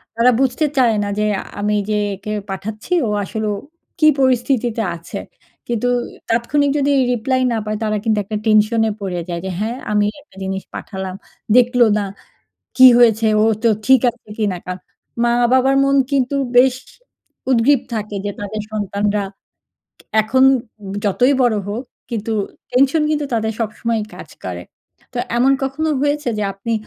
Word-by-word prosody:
তারা 235 +2 +4
বুঝতে 270 +3 +1
চায় 235 -4 +4
না, 205 - -3
যে 210 - +1 0.3
আমি 210 +1 0
যে 210 - +1 0.2
একে 210 +2 -6 0.2
পাঠাচ্ছি, 210 - -5
ও - - -1
আসলে 215 +2 -3
ও - - -2 0.4
কি 310 - +5
পরিস্থিতিতে 245 -3 +1
আছে? 170 0 -7 0.5
কিন্তু 240 +1 0 0.4
তাৎক্ষণিক 275 +5 +1
যদি 285 0 +1 0.2
রিপ্লাই 255 +2 0
না - - 0
পায়, 215 0 -2
তারা 215 -1 0
কিন্তু 220 -2 +1
একটা 210 +2 -4
টেনশনে 220 +1 +3
পড়ে 185 -3 -3
যায়, 170 - -3
যে - - -3
হ্যাঁ, 225 +4 -2
আমি 210 0 +3 0.2
একটা 290 -5 -25
জিনিস 190 0 -3
পাঠালাম। 190 -2 -6 0.4
দেখল 245 0 +3 0.2
না, 205 - -1 0.7
কি 260 0 +9
হয়েছে? 225 -2 +4 0.2
ও - - +4 0.2
তো 230 - +6 0.2
ঠিক 265 -1 +6
আছে 235 -2 -25
কিনা? 205 -4 0
কারণ 180 0 -5 0.4
মা-বাবার 250 +3 +3
মন 275 0 +3 0.2
কিন্তু 275 0 +1 0.2
বেশ 255 0 +6 0.8
উদগ্রীব 255 +2 +4
থাকে, 210 -1 -4
যে 205 - -1
তাদের 205 +1 -4
সন্তানরা 205 0 -1 1.0
এখন 260 +5 +2 0.6
যতই 250 +8 +3
বড় 240 -3 +3
হোক, 225 +6 -4 0.3
কিন্তু 225 -1 -3 0.4
টেনশন 275 +5 +3
কিন্তু 300 -1 0
তাদের 220 -1 0
সবসময়ই 225 0 -2
কাজ - - -10
করে। - - -5 0.5
তো 250 - -5 0.2
এমন 260 +3 +4
কখনো 280 +4 -1
হয়েছে? 290 -2 0
যে 210 - -1
আপনি 215 +4 -4
230 Hz, 155 wpm, -19 LUFS, 210-260 Hz, 1.0 s, কি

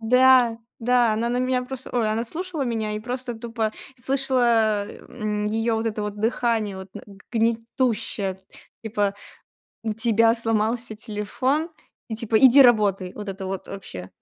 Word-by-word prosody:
Да, 250 0 +5 0.2
да, 240 -1 +3
она 230 +2 -1
на 245 - -1
меня 255 0 +1
просто, 265 0 -8
ой, 230 -3 +1
она 225 +2 -1
слушала 325 +3 -4
меня 225 -4 -2
и 210 - -3
просто 245 +1 -4
тупо 225 -1 -3 0.3
слышала, 240 -5 +2
м, 210 -3 -4
её 225 +1 0
вот 225 +1 -2
это 215 -1 -2
вот 210 0 -4
дыхание, 225 -2 0
вот 190 0 -9
на - - -8
г 200 -1 -14
гнетущее, 225 -3 -1 0.4
типа: 205 -2 -1 0.7
у 220 -1 -1
тебя 225 0 +4
сломался 225 0 0
телефон 255 +9 -2 0.4
и 220 - -3
типа 220 0 +1
иди 265 +2 +8
работай. 200 -6 +3
Вот 210 -1 -7
это 195 0 -5
вот 190 -1 -5
вообще. 95 - -8
225 Hz, 155 wpm, -24 LUFS, 210-245 Hz, 0.7 s, иди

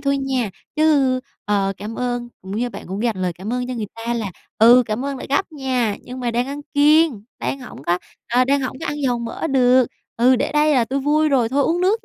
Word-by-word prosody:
thôi 280 0 +1
nha", 260 -5 -1 0.3
chứ, 280 -5 +3 0.2
ờ, 200 -1 +1
cảm 215 +3 -6
ơn 245 -1 -2
cũng 190 +2 -6
như 245 +2 0
bạn - - -9
cũng 195 +4 -4
dành 230 -3 0
lời 180 -1 0
cảm 190 +7 -6
ơn 250 0 -1
cho 255 - -4
người 220 -3 -3 0.2
ta 235 - 0
là 220 -5 -3 0.3
"Ừ, 240 +3 +8
cảm 215 +4 -2
ơn 280 -1 -3
đã - - -7
gắp 315 +6 0
nha, 255 -7 -1
nhưng 255 +1 -8
mà 245 -1 -1
đang 240 +2 0
ăn 285 +1 -5
kiêng, 295 -5 +4 0.2
đang 275 - -3
hổng 245 - -10
có 175 +1 +2 0.3
ờ, 250 +2 +3
đang 280 +2 +2
hổng 260 0 -4
có - - -4
ăn 295 - -2
dầu 250 -3 +1
mỡ 235 +6 -4
được. 255 -3 +4 0.3
Ừ, 250 +2 +5
để - - -1
đây 300 0 +3
là 250 -3 +3
tui 270 +4 -2
vui 305 +3 +2
rồi 255 -5 +2
thôi 280 +4 +1
uống 335 +5 +1
nước 405 +5 +1
255 Hz, 250 wpm, -21 LUFS, 230-280 Hz, 0.3 s, Ừ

